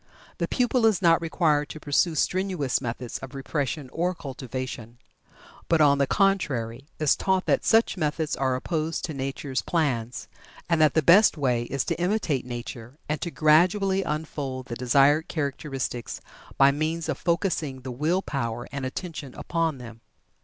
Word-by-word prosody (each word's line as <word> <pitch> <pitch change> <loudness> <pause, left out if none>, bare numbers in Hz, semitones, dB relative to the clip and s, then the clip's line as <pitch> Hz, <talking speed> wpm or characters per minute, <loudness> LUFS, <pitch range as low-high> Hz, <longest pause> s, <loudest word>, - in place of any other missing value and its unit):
The - - 0
pupil 245 -2 +2
is 215 -4 +2
not 170 -3 +4
required 155 -3 +1
to 155 - -8
pursue 155 +3 +1
strenuous 180 -6 0
methods 120 -1 -5
of 135 +1 -9
repression 140 0 -3
or 180 +2 0
cultivation, 130 -4 -6 0.7
but, 165 - +4
on 140 -2 +5
the 140 - +2
contrary, 140 - 0
is 155 -2 +3
taught 190 -1 0
that - - +2
such 225 -3 +3
methods 155 -1 -1
are 130 -1 0
opposed 160 +4 -2
to 160 - -5
nature's 135 0 -3
plans, 130 -7 -1 0.4
and 165 -2 +2
that 155 -3 +4
the 160 - +3
best 185 +5 +6
way 125 -4 +1
is 135 +1 -2
to - - -2
imitate 175 - 0
nature 120 +1 -7
and 150 +1 -2
to 170 - -2
gradually 180 +6 +3
unfold 150 -6 -4
the 120 - -6
desired 140 +5 +3
characteristics 135 -5 -4 0.4
by 135 0 +6
means 155 +3 -2
of - - -2
focusing 170 -6 -1
the 130 0 -6
will 160 +9 0
power 120 -4 -3
and 140 -2 -3
attention 145 -2 -7
upon 165 -4 -1
them. 115 -2 -11
145 Hz, 160 wpm, -26 LUFS, 130-170 Hz, 0.7 s, best